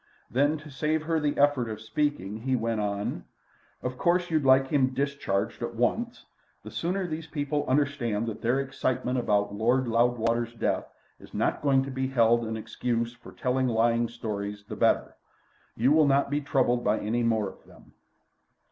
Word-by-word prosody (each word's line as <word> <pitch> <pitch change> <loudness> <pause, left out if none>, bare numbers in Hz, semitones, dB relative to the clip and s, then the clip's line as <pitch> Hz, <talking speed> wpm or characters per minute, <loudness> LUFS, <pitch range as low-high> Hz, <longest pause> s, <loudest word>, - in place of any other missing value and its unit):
Then, 145 +5 +2
to 155 0 -12
save 155 +3 0
her 160 0 0
the 145 -1 -1
effort 140 -5 +3
of 110 -1 -5
speaking, 110 -2 -2
he 130 +3 -1
went 115 -2 -1
on: 100 0 -2 0.6
"Of 125 0 -4
course 175 0 +2
you'd 155 -2 +2
like 135 0 +5
him 130 -3 +2
discharged 140 -10 -1
at 120 0 -4
once. 230 - -1 0.4
The - - -9
sooner 185 +3 -1
these 160 -1 -5
people 145 -1 -2
understand 130 -6 0
that 110 -2 -5
their 120 +4 +2
excitement 130 -2 -1
about 105 -3 +1
Lord 120 +5 +1
Loudwater's 115 0 +1
death - - -1 0.3
is - - -14
not - - 0
going 135 -2 +3
to 135 - -6
be 130 0 -1
held 120 -2 +3
an 110 0 -3
excuse 115 +1 -2
for 120 -1 -14
telling 130 +1 0
lying 115 0 +2
stories 105 -3 -5
the - - -7
better. - - +2 0.6
You 125 +5 +3
will 155 -1 +5
not 140 0 +2
be 145 +1 +1
troubled 130 -4 +1
by - - +2
any 115 +3 -1
more 110 -3 +1
of - - -11
them." - - -19
125 Hz, 175 wpm, -27 LUFS, 115-145 Hz, 0.6 s, like